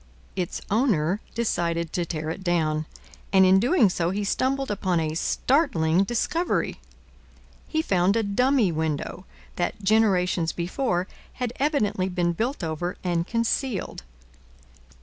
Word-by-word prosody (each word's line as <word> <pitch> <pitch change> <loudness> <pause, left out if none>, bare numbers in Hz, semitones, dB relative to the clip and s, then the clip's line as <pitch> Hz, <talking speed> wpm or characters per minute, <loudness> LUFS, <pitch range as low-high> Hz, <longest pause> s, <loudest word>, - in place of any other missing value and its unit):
Its 180 -3 -3
owner 205 - +2
decided 170 -7 -1
to 175 -1 -1
tear 155 -1 -3
it 190 - -7
down, 155 -3 0 0.4
and 190 -1 +6
in 190 +1 +6
doing 245 - +4
so 175 -2 0
he 200 +3 -2
stumbled 265 +5 0
upon 185 -4 0
a 155 -1 -1
startling 175 - +2
discovery. 240 - -1 0.9
He 315 0 0
found 185 - +2
a 225 - +2
dummy 235 0 +2
window 160 +3 -3 0.3
that, 190 +4 -2
generations 190 -5 +2
before, 180 +1 -1 0.3
had 245 -2 -3
evidently 215 -10 +1
been 175 -1 0
built 235 - -2
over 165 +2 -3
and 175 -2 0
concealed. 230 -1 -1
190 Hz, 130 wpm, -25 LUFS, 170-230 Hz, 0.9 s, and